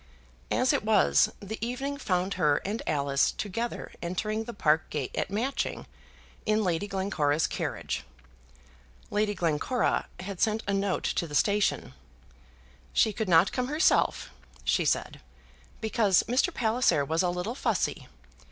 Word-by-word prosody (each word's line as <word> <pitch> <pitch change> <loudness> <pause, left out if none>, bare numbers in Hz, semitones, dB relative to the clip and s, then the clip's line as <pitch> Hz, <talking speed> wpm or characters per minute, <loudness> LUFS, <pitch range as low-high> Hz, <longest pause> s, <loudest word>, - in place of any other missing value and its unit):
As - - +2
it - - 0
was, 70 0 +4
the 215 +2 -6
evening 270 +4 -2
found 185 -7 -1
her 145 -1 +2
and 210 +4 -2
Alice 140 -2 +2
together 230 +4 -4
entering 215 +5 -2
the 235 - -5
park 155 -5 +2
gate 145 -4 -4
at - - -1
Matching, 230 +8 -2 0.6
in 215 0 +1
Lady 180 +1 0
Glencora's 170 -7 0
carriage. - - -3 1.1
Lady 210 0 +1
Glencora 175 - 0
had 190 0 -6
sent 220 0 +1
a 200 - +1
note 195 -1 0
to 170 - -1
the 145 - -6
station. 205 +5 +1 1.0
"She 220 - +3
could 215 -1 -3
not 170 +2 +5
come 250 -1 -1
herself," 300 +6 +2 0.3
she - - +1
said, - - 0 0.6
"because 220 -4 +3
Mr. 255 +9 +1
Palliser 230 - +2
was 160 +4 +1
a 180 - +1
little 180 +6 -3
fussy. 265 - -1
200 Hz, 140 wpm, -28 LUFS, 170-225 Hz, 1.1 s, not